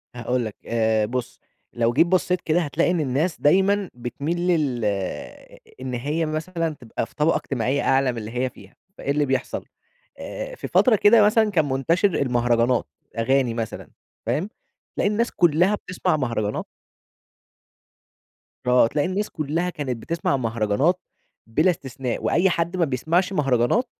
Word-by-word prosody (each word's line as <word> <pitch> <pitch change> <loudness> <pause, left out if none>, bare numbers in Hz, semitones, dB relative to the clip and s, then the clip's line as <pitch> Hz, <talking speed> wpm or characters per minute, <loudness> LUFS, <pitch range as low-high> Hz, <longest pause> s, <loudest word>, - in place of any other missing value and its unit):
هاقول 120 +1 -1
لك، 110 - -6
آآ 110 -2 +1
بُص، 120 +2 -4 0.3
لو 120 0 +1
جيت 165 +7 +4
بصّيت 180 0 +1
كده 165 +2 +1
هتلاقي 165 +2 +1
إن 175 - 0
الناس 150 +4 -1
دايمًا 195 +5 +3
بتميل 140 +7 -4
لل 140 -10 +1 1.0
إن 130 -1 -4
هي 145 +7 -1
مثلًا 165 +2 -2
تبقى 120 -4 -5
في - - -22
طبقة 155 +2 +2
اجتماعية 135 +2 -1
أعلى 135 -1 +3
من 120 - -8
اللي 110 -1 -6
هي 125 +2 -1
فيها، - - -17 0.2
فإيه 140 - -2
اللي 145 +1 +2
بيحصل؟ 130 -1 -2 0.5
آآ - - -6
في - - -6
فترة 250 -4 +4
كده 215 +2 +6
مثلًا 215 +1 +4
كان 160 -7 +1
منتشر 165 +9 +2
المهرجانات، 120 -1 +2 0.3
أغاني 125 +1 +2
مثلًا، 115 -1 -5 0.4
فاهم؟ 180 +7 -1 0.5
تلاقي - - +1
الناس 230 +3 0
كلّها 175 +4 +3
بتسمع 180 -5 -1
مهرجانات. 115 -6 -2 2.0
آه، 125 -2 +5
تلاقي 145 +4 0
الناس 200 +3 -2
كلها 160 +4 -2
كانت 140 -8 -4
بتسمع 165 +3 -1
مهرجانات 115 - +1 0.5
بلا 155 +11 +2
استثناء، 135 -5 -5
وأي 185 +3 +3
حد 170 +1 -1
ما 170 - +3
بيسمعش 165 +8 0
مهرجانات 135 - +2
145 Hz, 150 wpm, -23 LUFS, 125-175 Hz, 2.0 s, كده